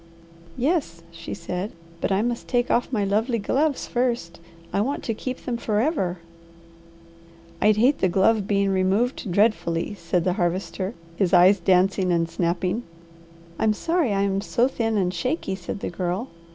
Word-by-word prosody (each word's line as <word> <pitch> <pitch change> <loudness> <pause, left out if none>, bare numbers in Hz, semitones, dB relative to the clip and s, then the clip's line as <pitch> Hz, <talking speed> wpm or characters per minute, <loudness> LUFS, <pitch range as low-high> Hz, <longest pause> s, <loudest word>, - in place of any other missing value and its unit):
"Yes," 255 - 0
she 165 0 -7
said. 180 +4 -4 0.3
"But - - -1
I 195 +2 +2
must 240 0 -2
take 245 -1 +1
off 245 - +1
my 215 -5 +1
lovely 220 +5 +1
gloves 275 +7 0
first. 235 -9 -1 0.3
I 200 - +2
want 275 +7 -2
to 225 - -1
keep 255 +4 -6
them 240 -2 -1
forever." 215 - 0 1.4
"I'd 210 +1 +4
hate 255 +6 +3
the 185 - +2
glove 195 +3 +2
being 200 -1 +2
removed 195 +4 0
dreadfully," 200 -3 +1
said 175 -2 -1
the 180 0 +1
Harvester, 185 +2 -2 0.2
his 195 -1 +1
eyes 185 +3 +6
dancing 185 +1 +2
and 165 -1 +2
snapping. 175 +5 -1 0.8
"I'm 215 -1 +3
sorry 325 +2 0
I 195 0 +1
am 195 0 0
so 235 +4 +2
thin 225 -4 -1
and 180 -2 +1
shaky," 250 - -2
said 190 +1 -6
the - - -3
Girl. 180 +7 -2
200 Hz, 160 wpm, -24 LUFS, 180-235 Hz, 1.4 s, eyes